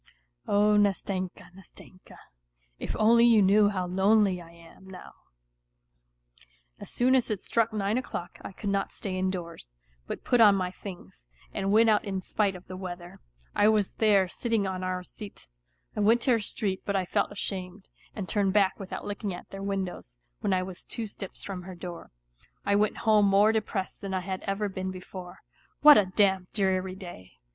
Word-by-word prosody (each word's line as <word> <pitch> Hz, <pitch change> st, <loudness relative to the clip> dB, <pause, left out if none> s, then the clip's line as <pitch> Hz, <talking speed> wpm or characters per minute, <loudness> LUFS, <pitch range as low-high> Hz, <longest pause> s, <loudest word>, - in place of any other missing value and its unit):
Oh, 210 Hz, +1 st, +4 dB
Nastenka, 195 Hz, -3 st, -1 dB
Nastenka! 185 Hz, 0 st, -15 dB, 0.6 s
If -, -, -4 dB
only 230 Hz, +2 st, +5 dB
you 235 Hz, -2 st, +6 dB
knew 205 Hz, +1 st, +5 dB
how 185 Hz, -3 st, -2 dB
lonely 190 Hz, 0 st, +2 dB
I 165 Hz, -, -13 dB
am 170 Hz, +3 st, -17 dB
now! 185 Hz, -1 st, -11 dB, 1.7 s
As -, -, -10 dB
soon 250 Hz, +2 st, +2 dB
as 255 Hz, -3 st, +2 dB
it 210 Hz, -3 st, -1 dB
struck 230 Hz, +3 st, 0 dB
nine 210 Hz, +2 st, 0 dB
o'clock 180 Hz, -8 st, -7 dB
I -, -, -8 dB
could 200 Hz, +1 st, -4 dB
not 195 Hz, 0 st, -1 dB
stay 190 Hz, -3 st, -5 dB
indoors, 175 Hz, -, -4 dB, 0.3 s
but -, -, -6 dB
put 245 Hz, -2 st, +3 dB
on 205 Hz, -3 st, +7 dB
my 185 Hz, -2 st, -1 dB
things, 180 Hz, -, -11 dB, 0.3 s
and 195 Hz, 0 st, -1 dB
went 225 Hz, +2 st, +5 dB
out 215 Hz, -1 st, +3 dB
in 195 Hz, -2 st, -3 dB
spite 195 Hz, +1 st, -1 dB
of 180 Hz, -, -11 dB
the 185 Hz, -, -8 dB
weather. 175 Hz, -2 st, -8 dB, 0.3 s
I 205 Hz, -, +4 dB
was 210 Hz, -3 st, +2 dB
then, 205 Hz, -4 st, +3 dB
silt 235 Hz, +6 st, -5 dB
in<: 215 Hz, -3 st, +2 dB
on 185 Hz, -1 st, -3 dB
our 185 Hz, 0 st, -2 dB
seat. 205 Hz, +2 st, -11 dB, 0.5 s
I -, -, -3 dB
went 225 Hz, +3 st, +4 dB
to 255 Hz, -, +2 dB
her 230 Hz, -, +4 dB
street, 200 Hz, -2 st, -3 dB
but 200 Hz, -, -2 dB
I 190 Hz, -1 st, +1 dB
felt -, -, 0 dB
ashamed, 190 Hz, -1 st, -5 dB, 0.3 s
and 195 Hz, -3 st, -5 dB
turned 200 Hz, -2 st, +1 dB
back 200 Hz, -2 st, +2 dB
without 195 Hz, -2 st, -6 dB
looking 205 Hz, -2 st, -4 dB
at -, -, -12 dB
their 195 Hz, -, -7 dB
windows, 190 Hz, -, -4 dB, 0.2 s
when -, -, -1 dB
I 185 Hz, -1 st, +2 dB
was 185 Hz, -1 st, -8 dB
two 230 Hz, -, -4 dB
steps 195 Hz, -2 st, -8 dB
from 190 Hz, -2 st, -6 dB
her 185 Hz, +1 st, -9 dB
door. 175 Hz, -1 st, -8 dB, 0.6 s
I 200 Hz, -, +2 dB
went 210 Hz, +1 st, +1 dB
home 210 Hz, -2 st, +5 dB
more 200 Hz, +2 st, +5 dB
depressed 210 Hz, -3 st, -3 dB
than 195 Hz, -1 st, -3 dB
I 185 Hz, -, -1 dB
had 190 Hz, 0 st, -4 dB
ever 200 Hz, +1 st, -1 dB
been 190 Hz, -1 st, -4 dB
before. 185 Hz, 0 st, -9 dB, 0.4 s
What 295 Hz, -4 st, +10 dB
a 200 Hz, -, +1 dB
damp, 190 Hz, -1 st, +1 dB
dreary 190 Hz, -2 st, 0 dB
day 175 Hz, -, -11 dB
195 Hz, 185 wpm, -28 LUFS, 185-210 Hz, 1.7 s, What